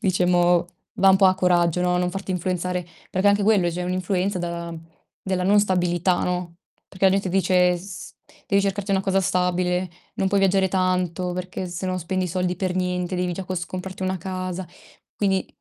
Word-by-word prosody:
diciamo, 180 Hz, -2 st, +3 dB, 0.3 s
va 195 Hz, 0 st, +5 dB
un 190 Hz, -, +6 dB
po' 190 Hz, -1 st, +5 dB
a 185 Hz, -, +4 dB
coraggio, 180 Hz, -1 st, +2 dB
no, 180 Hz, 0 st, +2 dB
non 180 Hz, 0 st, 0 dB
farti 195 Hz, 0 st, -5 dB
influenzare. 180 Hz, 0 st, -2 dB, 0.2 s
Perché 190 Hz, +2 st, +2 dB
anche 200 Hz, 0 st, +3 dB
quello 195 Hz, -5 st, +3 dB
cioè 180 Hz, +2 st, -4 dB
è -, -, -3 dB
un'influenza 185 Hz, +1 st, -1 dB
da 170 Hz, -1 st, -4 dB, 0.5 s
della 185 Hz, -1 st, -2 dB
non 205 Hz, +2 st, +5 dB
stabilità, 180 Hz, -2 st, +1 dB
no, 180 Hz, -1 st, -3 dB, 0.3 s
perché 190 Hz, 0 st, -3 dB
la 190 Hz, -, +7 dB
gente 195 Hz, -1 st, 0 dB
dice: 180 Hz, -1 st, +3 dB
"S 180 Hz, +1 st, -9 dB, 0.3 s
devi 200 Hz, 0 st, +2 dB
cercarti 200 Hz, 0 st, -2 dB
una 190 Hz, 0 st, +2 dB
cosa 195 Hz, 0 st, +2 dB
stabile, 180 Hz, 0 st, 0 dB, 0.2 s
non 195 Hz, -, 0 dB
puoi 200 Hz, 0 st, +2 dB
viaggiare 195 Hz, 0 st, +3 dB
tanto 180 Hz, -1 st, 0 dB
perché 180 Hz, +1 st, -4 dB
se 175 Hz, +1 st, -6 dB
no 185 Hz, 0 st, -1 dB
spendi 185 Hz, +2 st, -2 dB
i -, -, -3 dB
soldi 180 Hz, 0 st, -1 dB
per 185 Hz, -1 st, -2 dB
niente, 180 Hz, 0 st, -1 dB
devi 180 Hz, 0 st, -1 dB
già 190 Hz, +2 st, -5 dB
cos 175 Hz, -1 st, -3 dB
comprarti 185 Hz, +1 st, -6 dB
una 185 Hz, 0 st, 0 dB
casa". 185 Hz, 0 st, -4 dB, 0.5 s
Quindi 190 Hz, -2 st, 0 dB
185 Hz, 190 wpm, -23 LUFS, 180-190 Hz, 0.5 s, la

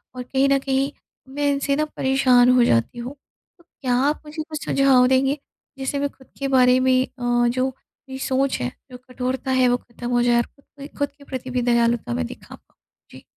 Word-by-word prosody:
और 250 Hz, -, -5 dB
कहीं 270 Hz, +2 st, +1 dB
न 275 Hz, -, +4 dB
कहीं 270 Hz, +1 st, 0 dB, 0.4 s
मैं 290 Hz, 0 st, 0 dB
इनसे 280 Hz, 0 st, 0 dB
ना 305 Hz, -, +1 dB
परेशान 255 Hz, -2 st, +4 dB
हो 245 Hz, -, +5 dB
जाती 115 Hz, -, +1 dB
हूँ। 255 Hz, +4 st, -6 dB, 0.4 s
तो 340 Hz, -, -24 dB
क्या 255 Hz, -6 st, -4 dB, 0.2 s
आप 300 Hz, -, -3 dB
मुझे 310 Hz, +1 st, -6 dB
कुछ 305 Hz, -2 st, -6 dB
सुझाव 265 Hz, -2 st, +4 dB
देंगे, 270 Hz, +2 st, +2 dB, 0.4 s
जिससे 270 Hz, +1 st, -2 dB
मैं 285 Hz, 0 st, 0 dB
ख़ुद 265 Hz, -, -21 dB
के 275 Hz, -, -1 dB
बारे 255 Hz, -1 st, +4 dB
में 260 Hz, 0 st, +3 dB
अ, 240 Hz, -1 st, 0 dB
जो 255 Hz, +2 st, 0 dB
मेरी 265 Hz, 0 st, -13 dB
सोच 265 Hz, 0 st, 0 dB
है, 125 Hz, -, -2 dB, 0.2 s
जो 250 Hz, -, -8 dB
कठोरता 255 Hz, +1 st, -3 dB
है, 255 Hz, -1 st, +3 dB
वो 245 Hz, -, +2 dB
ख़त्म 240 Hz, 0 st, -9 dB
हो 240 Hz, 0 st, +2 dB
जाए 240 Hz, 0 st, +3 dB
और 235 Hz, -, +2 dB
ख़ुद 280 Hz, -, -30 dB
के 280 Hz, -, -7 dB
ख़ुद 285 Hz, -, 0 dB
के, 285 Hz, -, -19 dB
प्रति 260 Hz, -2 st, -6 dB
भी 250 Hz, -1 st, 0 dB
दयालुता 235 Hz, -, +1 dB
में 85 Hz, -, -1 dB
दिखा -, -, -12 dB, 0.5 s
जी। -, -, -13 dB
260 Hz, 210 wpm, -22 LUFS, 245-275 Hz, 0.5 s, हो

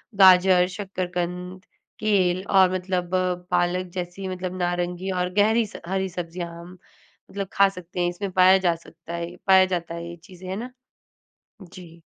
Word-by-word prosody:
गाजर, 185 Hz, -1 st, +6 dB
शक्करकंद, 180 Hz, -1 st, -5 dB, 0.3 s
केल 190 Hz, -4 st, +2 dB
और 190 Hz, -2 st, +5 dB
मतलब 185 Hz, -1 st, -2 dB, 0.4 s
पालक 180 Hz, +1 st, +1 dB
जैसी 180 Hz, +1 st, -5 dB
मतलब 185 Hz, 0 st, -5 dB
नारंगी 175 Hz, +1 st, -2 dB
और 180 Hz, -1 st, -1 dB
गहरी 220 Hz, +3 st, +3 dB
स -, -, -11 dB
हरी 190 Hz, 0 st, -1 dB
सब्जियाँ 175 Hz, 0 st, -5 dB
हम 180 Hz, +2 st, -12 dB, 0.5 s
मतलब 200 Hz, -1 st, -4 dB
खा 200 Hz, 0 st, +5 dB
सकते 180 Hz, -1 st, -9 dB
हैं 175 Hz, 0 st, +2 dB
इसमें 190 Hz, +2 st, -5 dB
पाया 185 Hz, +1 st, +6 dB
जा 180 Hz, -3 st, +1 dB
सकता 165 Hz, 0 st, -12 dB
है 170 Hz, 0 st, -4 dB
ये 180 Hz, -, -13 dB
पाया 190 Hz, -1 st, +7 dB
जाता 170 Hz, -1 st, -5 dB
है 170 Hz, 0 st, -6 dB
ये 170 Hz, -, -8 dB
चीज़ें 185 Hz, 0 st, -11 dB
है 190 Hz, -, -3 dB
ना? 245 Hz, +4 st, -6 dB, 0.9 s
जी। 175 Hz, -2 st, -13 dB
180 Hz, 165 wpm, -24 LUFS, 175-190 Hz, 0.9 s, पाया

